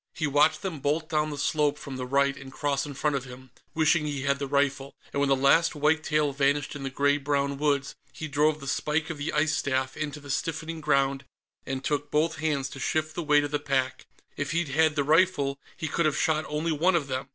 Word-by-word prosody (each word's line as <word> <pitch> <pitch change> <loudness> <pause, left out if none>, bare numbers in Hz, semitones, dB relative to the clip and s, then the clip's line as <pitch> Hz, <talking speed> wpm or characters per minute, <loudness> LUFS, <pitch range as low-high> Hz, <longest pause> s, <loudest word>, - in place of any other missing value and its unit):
He 160 -2 -1
watched 150 +2 +3
them 180 -6 -4
bolt 155 +4 -1
down 155 -1 +1
the 145 - -5
slope 145 0 +1
from 140 -2 -8
the 125 -1 -4
right 140 +1 +2
and 135 -1 -11
cross 140 0 -1
in 140 - -7
front 150 +1 0
of 135 -1 -3
him, 130 0 -12 0.2
wishing 155 0 +3
he 140 -2 -3
had 140 0 +1
the 140 - -3
rifle, 140 0 0 0.2
and 140 - -1
when 140 -1 +2
the 135 - +5
last 140 +5 +3
white 155 +2 +2
tail 150 -2 +1
vanished 140 +1 +1
in 145 - -6
the 135 - -3
gray 145 +2 +2
brown 140 0 -1
woods 140 -2 0 0.2
he 155 - -6
drove 150 +1 +2
the 140 - -9
spike 150 +4 -1
of 155 - -7
the 145 - -2
ice 150 +1 +1
staff 130 -2 -1
into 150 -1 -4
the 145 -1 -7
stiffening 160 +2 -3
ground 140 -2 +1 0.4
and 135 0 -3
took 145 +1 -1
both 160 +2 +1
hands 150 -4 -1
to 135 - -9
shift 155 +3 -1
the - - -3
weight 150 -2 +3
of 145 - -4
the 145 - 0
pack. 135 -3 -1 0.3
If 145 +1 -3
he'd 170 -3 0
had 155 +2 +3
the 145 - +1
rifle, 150 -3 +2 0.2
he 160 - -3
could 165 +2 +1
have 150 - 0
shot 155 0 +1
only 155 +2 -1
one 170 +4 +2
of 160 -4 +1
them. 130 0 -4
145 Hz, 240 wpm, -27 LUFS, 140-155 Hz, 0.4 s, the